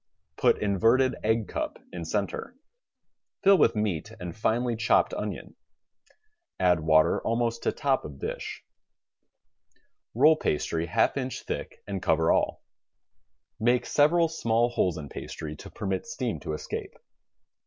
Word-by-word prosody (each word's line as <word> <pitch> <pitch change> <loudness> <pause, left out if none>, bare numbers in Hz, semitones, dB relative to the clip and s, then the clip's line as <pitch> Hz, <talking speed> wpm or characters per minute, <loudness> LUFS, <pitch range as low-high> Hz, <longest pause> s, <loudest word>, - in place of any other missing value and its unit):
Put - - +3
inverted 115 +6 +3
egg 110 0 +1
cup - - -4 0.2
in 85 -2 -5
center. 100 - -3 0.9
FiU 195 -2 +7
with 115 -5 +4
meat 105 -2 -2
and 90 -2 -6
finely 120 +2 0
chopped 110 0 +2
onion. - - -5 1.1
Add 90 -3 +4
water 80 0 +3
almost 115 0 -1
to - - +1
top 135 -2 0
of 70 -2 -9
dish. - - -5 1.5
Roll 150 +6 +6
pastry 80 - -1
half 115 +8 +2
inch 130 -1 -3
thick - - -6
and 100 -2 -4
cover 80 -2 +2
all. - - 0 1.0
Make 120 +2 +2
several 165 +3 +4
small 120 -7 +1
holes 90 -7 0
in 75 -2 -6
pastry 75 +2 -7
to - - -10
permit 95 +2 -3
steam 130 -7 -3
to - - -5
escape. 75 - -5
110 Hz, 130 wpm, -27 LUFS, 90-125 Hz, 1.5 s, FiU